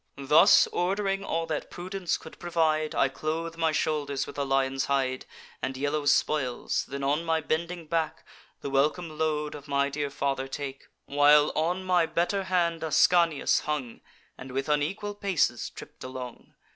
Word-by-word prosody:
Thus, 140 +3 +6
ord'ring 195 +2 0
all 165 -3 -1
that 155 -2 -4
prudence 185 0 -3
could 160 - -13
provide, 160 -3 0
I - - +4
clothe 160 +4 -4
my 165 -1 +1
shoulders 145 -3 -1
with - - -10
a - - +1
lion's 135 0 0
hide 130 -2 -1 0.3
And 130 0 -3
yellow 145 +1 -1
spoils; 130 -6 +1
then, 140 0 -5
on 145 +4 +1
my 165 -1 +1
bending 165 +2 -3
back, 160 0 -2 0.4
The 140 - -5
welcome 155 +4 +1
load 150 -1 0
of 145 -1 -10
my 140 0 +1
dear 145 0 -3
father 135 -1 -2
take; 135 0 -6 0.2
While 145 +1 +5
on 175 +4 0
my 180 -3 +2
better 190 +4 0
hand 170 -3 +1
Ascanius 165 0 +3
hung, 145 -6 -3 0.4
And 125 0 -9
with 135 +1 -2
unequal 155 +8 -1
paces 190 - 0
tripp'd - - -12
along. 130 -1 -8
150 Hz, 160 wpm, -27 LUFS, 140-170 Hz, 0.4 s, Thus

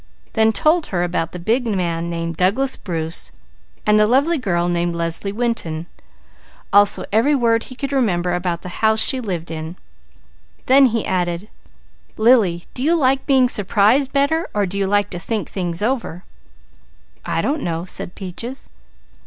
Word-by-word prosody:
Then 220 -1 +4
told 310 +8 +2
her 175 -2 -1
about 170 -2 -2
the - - -7
big 230 +8 0
man 170 -5 -1
named 165 -1 -3
Douglas 210 - +1
Bruce 165 -2 -4 0.5
and 210 0 +4
the 210 - +4
lovely 285 +7 +2
girl 175 -7 0
named 175 -1 -1
Leslie 170 +4 -1
Winton, 205 -8 -2 0.9
also 205 0 +5
every 230 +8 +3
word 230 -3 +2
he 255 - -11
could 275 +1 -4
remember 180 -9 +1
about 175 -1 -2
the 180 - -6
house 220 0 +3
she 260 +2 +2
lived 180 -8 -4
in; 160 +1 -6 0.9
then 270 +1 +6
he 230 -2 -1
added: 180 +2 -2 0.7
"Lily, 215 -7 +3
do 250 - -6
you 320 +5 +3
like 270 -4 +3
to - - -29
be 265 -3 +4
surprised 220 +5 +2
better 290 +4 +1
or 205 -1 +2
do 190 +1 -6
you 200 -1 0
like 205 0 +1
to 175 - -5
think 215 +3 -3
things 175 -1 -4
over?" 230 -8 -2 1.0
"I - - -1
don't 295 +1 -1
know," 165 0 -3
said 180 - -4
Peaches. 220 +8 -7
205 Hz, 165 wpm, -20 LUFS, 175-250 Hz, 1.0 s, then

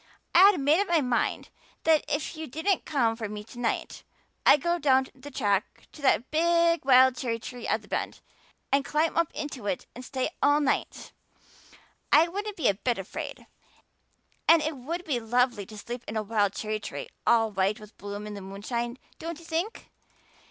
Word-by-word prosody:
I 380 +3 +9
had 390 -6 +1
made 290 +5 +3
up 405 - -1
my 340 -3 +3
mind 250 -3 -1 0.3
that 320 -2 +4
if 295 +3 -2
you 315 0 -6
didn't 320 +8 0
come 240 -7 +1
for 225 -2 -5
me 210 0 -6
to 240 +3 -12
night 235 -2 -2 0.5
I'd 295 - +7
go 345 0 +1
down 265 -3 +4
the 270 +2 -11
track 205 -7 -1
to 300 - -13
that 260 -2 +2
big 335 +1 +3
wild 260 -1 +6
cherry 245 -5 -2
tree 245 +1 -8
at - - 0
the - - -16
bend, - - -3 0.5
and 275 0 +3
climb 305 +5 0
up 335 -1 +1
into 275 -8 -5
it 190 -3 -2
to 250 - -9
stay 260 +3 -3
all 290 +1 +4
night. 285 -2 -1 1.0
I 315 +3 +7
wouldn't 405 +3 -5
be 310 - +1
a 200 - +4
bit 235 +5 -1
afraid, 195 -1 -6 1.0
and 330 -1 +7
it 310 0 -2
would 330 +8 -5
be 270 -6 0
lovely 235 -2 +1
to 215 - -11
sleep 240 +3 -6
in 220 - -3
a 215 - 0
wild 205 -2 +1
cherry 215 0 -3
tree - - -6 0.2
all 225 -2 +4
white 195 +3 0
with 210 0 -14
bloom 205 +1 -6
in 210 - -6
the 200 - -7
moonshine, 235 +6 -4 0.2
don't 335 -1 -5
you 335 - -14
think? 340 +7 -3
260 Hz, 195 wpm, -27 LUFS, 220-320 Hz, 1.0 s, I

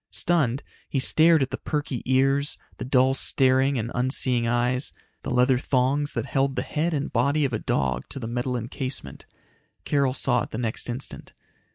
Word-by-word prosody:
Stunned, 145 -7 0 0.3
he - - -2
stared 160 +3 +4
at 130 - -4
the 130 - -4
perky 145 -4 -3
ears, 135 +2 +2 0.2
the - - -3
dull 130 0 +3
staring 135 0 +2
and 115 +1 -3
unseeing 125 -1 +1
eyes, 125 +2 0 0.3
the - - -6
leather 125 +1 +3
thongs 140 +3 0
that - - -2
held 135 0 0
the - - -1
head 160 +3 -1
and 145 -3 -3
body 140 +5 +2
of 130 - -2
a 110 - 0
dog 65 -2 -1
to - - -6
the 125 - -5
metal 125 +2 -2
encasement. 120 - -5 0.6
Carol 140 -3 +1
saw 125 -2 +2
it - - -5
the - - -6
next 115 0 -2
instant. 120 +3 -6
130 Hz, 180 wpm, -25 LUFS, 125-140 Hz, 0.6 s, stared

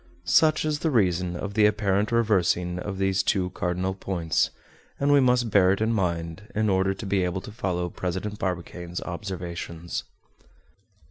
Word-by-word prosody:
Such 155 - +4
is 150 -1 0
the 160 - 0
reason 90 - +1
of 100 +3 -5
the 105 0 +5
apparent 105 0 +1
reversing 90 -6 +2
of 95 +1 -5
these 95 0 +2
two 95 -1 0
cardinal 90 +1 -1
points, 90 -4 0 0.5
and 145 +1 +3
we 145 - +7
must 125 -3 +3
bear 95 -2 +5
it 100 - -3
in 110 +1 +1
mind 85 0 -2
in 110 0 +2
order 95 +1 +2
to 105 - -7
be 95 -1 +1
able 90 +1 -2
to 105 - -9
follow 90 -6 -2
President 95 +4 -4
Barbicane's 90 -1 -4
observations. 85 -2 -5
95 Hz, 160 wpm, -26 LUFS, 90-105 Hz, 0.5 s, we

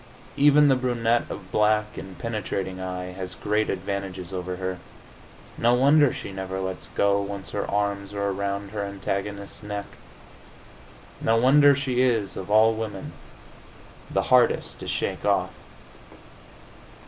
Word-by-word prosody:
Even 145 +1 +6
the 135 - +5
brunette 120 -2 0
of 95 -2 -8
black 105 0 +2
and 95 -2 -8
penetrating 95 -3 -3
eye 90 0 -4
has 90 -1 -7
great 105 +5 0
advantages 95 -2 -4
over 90 0 -3
her. 95 0 -4 0.8
No 120 +1 +4
wonder 140 +2 +5
she - - -6
never 95 0 -4
lets 95 -5 -4
go, 100 0 +3
once 100 -1 -6
her 100 - -3
arms 100 -1 -1
are 100 0 -1
around 100 0 -3
her 105 -1 -3
antagonist's 100 +1 -4
neck! 105 -1 -5 1.4
No 115 0 +3
wonder 140 +4 +6
she 130 -2 0
is, 115 -6 +1
of 95 +1 -6
all 110 +2 +5
women, 110 -3 -5 1.0
the - - 0
hardest - - +3
to - - -7
shake - - -2
off! - - +1
100 Hz, 135 wpm, -25 LUFS, 95-115 Hz, 1.4 s, Even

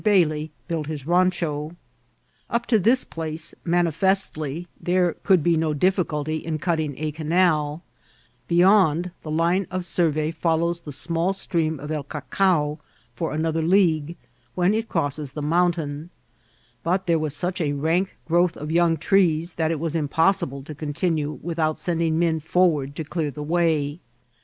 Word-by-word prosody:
Bailey 160 -7 +2 0.2
built 160 -3 -2
his 155 -3 -5
randio. 170 -2 0 0.7
Up 235 0 -1
to 225 -3 +3
this 235 +7 +3
place 160 -1 -5
manifestly 170 -2 0
there 180 -1 +2
could 185 -6 +3
be 170 +1 +3
no 160 -1 0
difficulty 155 -3 0
in 155 0 -3
cutting 155 -3 -1
a 155 0 -2
caiULl; 155 -1 +1 0.7
beyond, 175 -1 +4
the 155 - -8
line 170 +4 +1
of 185 +1 -2
mirvey 160 -3 0
follows 170 +2 0
the 155 -3 -9
small 170 +6 -1
stream 160 -5 -1
of 150 +2 -6
El 155 -1 -1
Cacao 150 +1 0 0.3
for 120 - -3
another 160 +1 0
league, 170 -2 +2 0.4
when 180 +2 +2
it 225 +1 -2
crosses 145 -3 -2
the 150 - -5
mountain; 165 -1 0 0.7
but 185 +3 0
there 165 -2 +2
vras 155 -2 -2
such 180 +1 -1
a 145 -3 0
rank 165 +6 0
growth 175 +1 +2
of 150 +1 -5
young 170 -1 +3
trees 170 -1 +2
that 160 -1 0
it 160 -2 -1
was 165 0 -3
impossible 150 -2 +1
to 155 - -8
continue 150 +1 -2
without 160 -2 -1
sending 165 -2 0
men 165 -1 +1
forward 155 -4 +1
to 160 - -3
clear 155 0 -2
the 150 +2 -6
way. 160 -2 0
165 Hz, 150 wpm, -24 LUFS, 150-175 Hz, 0.7 s, beyond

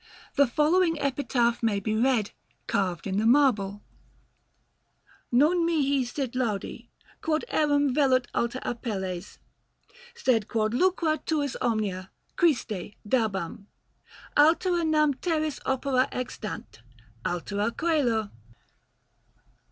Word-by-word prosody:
The 280 -1 +4
following 325 +5 +2
epitaph 250 -4 0
may 220 -3 +1
be 215 +2 -2
read, 230 -2 +2 0.3
carved 185 0 -1
in 195 0 -1
the 220 - 0
marble: 225 -7 +3 1.5
NON 300 +9 +4
MIHI 285 -5 +2
SIT 255 0 -4
LAUDI, 235 -6 -3 0.3
QUOD 315 +5 0
ERAM 290 -3 +2
VELUT 260 -3 +3
ALTER 240 +2 -1
APELLES, 195 -6 -4 0.8
SED 240 - +1
QUOD 215 -1 0
LUCRA 330 +1 +2
TUIS 290 -4 -1
OMNIA, 200 -5 -1 0.3
CHRISTE, 220 - 0
DABAM; 205 -4 -1 0.7
ALTERA 340 +3 +4
NAM 305 -2 +3
TERRIS 310 0 -2
OPERA 265 0 +1
EXTANT, 230 - -6 0.4
ALTERA 205 +5 -2
C[OE]LO. 245 -10 0
255 Hz, 100 wpm, -27 LUFS, 215-300 Hz, 1.5 s, The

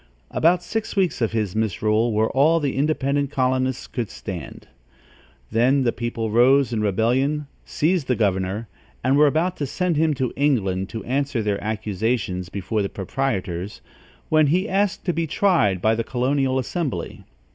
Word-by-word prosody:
About 175 +2 +3
six 225 +3 -3
weeks 185 -9 +1
of 115 - +1
his 110 -4 -2
misrule 110 +1 +1
were 110 +1 +1
all 155 +5 +4
the 145 -4 -2
independent 140 -1 0
colonists 130 -1 0
could 120 -5 -4
stand. 90 -8 -8 0.8
Then 130 +5 +3
the 120 - +2
people 115 -2 -3
rose 125 +2 +4
in 110 - 0
rebellion, 125 +9 +1 0.2
seized 160 -1 0
the 125 - +2
governor, 100 +1 -1 0.4
and 130 +1 +3
were 150 +1 +6
about 165 +5 0
to 145 - -2
send 180 +2 -1
him 155 -1 +2
to 130 -2 -2
England 100 -10 0
to 115 - -6
answer 135 -2 -1
their 100 -1 -1
accusations 105 -3 -2
before 100 +3 -2
the 100 - -2
proprietors, 95 -4 -3 0.5
when 155 -1 +4
he 180 +8 +1
asked 200 0 0
to 175 - +1
be 165 0 -1
tried 150 - +2
by 110 +1 +4
the 115 +1 -1
colonial 130 +2 0
assembly. 130 - -3
125 Hz, 160 wpm, -23 LUFS, 110-145 Hz, 0.8 s, were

